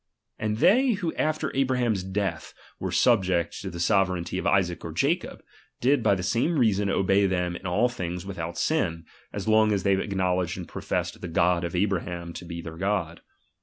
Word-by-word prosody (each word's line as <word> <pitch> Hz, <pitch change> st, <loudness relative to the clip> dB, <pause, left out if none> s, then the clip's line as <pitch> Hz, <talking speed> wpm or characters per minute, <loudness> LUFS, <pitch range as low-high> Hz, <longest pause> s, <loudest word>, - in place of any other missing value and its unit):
And 110 Hz, 0 st, -1 dB
they 240 Hz, -, +4 dB
who 180 Hz, -5 st, -2 dB
after 155 Hz, -2 st, -1 dB
Abraham's 125 Hz, -6 st, +1 dB
death 95 Hz, +1 st, -3 dB, 0.2 s
were -, -, -3 dB
subject 95 Hz, -8 st, +2 dB
to -, -, -5 dB
the 85 Hz, -, -8 dB
sove 95 Hz, +2 st, +3 dB
reignty 90 Hz, 0 st, -3 dB
of -, -, -2 dB
Isaac 90 Hz, -4 st, +1 dB
or -, -, -5 dB
Jacob, -, -, -1 dB, 0.4 s
did 135 Hz, +1 st, +3 dB
by 105 Hz, -3 st, +3 dB
the 90 Hz, -, -4 dB
same 125 Hz, -, +1 dB
reason 105 Hz, -5 st, +2 dB
obey 95 Hz, +1 st, +3 dB
them 90 Hz, -2 st, -1 dB
in 95 Hz, -, -6 dB
all 100 Hz, +8 st, +2 dB
things 90 Hz, -6 st, -5 dB
without 85 Hz, -3 st, -5 dB
ain, 85 Hz, -, -1 dB, 0.3 s
as -, -, -5 dB
long 110 Hz, 0 st, +4 dB
as 100 Hz, -3 st, 0 dB
they 100 Hz, -, +3 dB
acknowledged 95 Hz, -2 st, 0 dB
and 90 Hz, -, -7 dB
professed -, -, -3 dB
the -, -, -5 dB
God 85 Hz, +1 st, +2 dB
of 85 Hz, +1 st, -3 dB
Abraham 90 Hz, -3 st, -1 dB
to -, -, -8 dB
be 85 Hz, 0 st, -6 dB
their 80 Hz, 0 st, -8 dB
God. 95 Hz, -4 st, -2 dB
95 Hz, 190 wpm, -26 LUFS, 90-110 Hz, 0.4 s, they